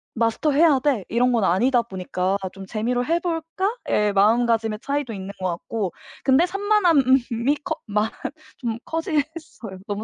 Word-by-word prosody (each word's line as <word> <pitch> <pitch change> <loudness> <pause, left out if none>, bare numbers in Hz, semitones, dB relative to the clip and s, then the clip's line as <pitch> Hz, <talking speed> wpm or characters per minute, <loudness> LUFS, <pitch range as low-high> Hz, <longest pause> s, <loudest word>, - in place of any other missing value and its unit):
마스터 230 +6 +1
해야 295 -2 +5
돼.' 260 -9 0
이런 245 +3 +2
건 230 -3 +2
아니다 235 +8 +3
보니까 190 -2 -2 0.2
'좀 195 0 -9
재미로 240 +4 -1
해볼까?' 335 - -1
의 210 -1 +2
마음가짐의 225 +1 +2
차이도 280 -4 -2
있는 195 -1 -6
것 185 - 0
같고 185 +2 -3 0.3
근데 275 +6 +4
산만함이 290 - +2
커 325 -3 -2
많 210 0 0 0.5
좀 235 -3 -3
커지긴 325 -2 0
했어요. 230 - -9
너무 205 +1 -3
240 Hz, 315 characters per minute, -23 LUFS, 210-300 Hz, 0.5 s, 해야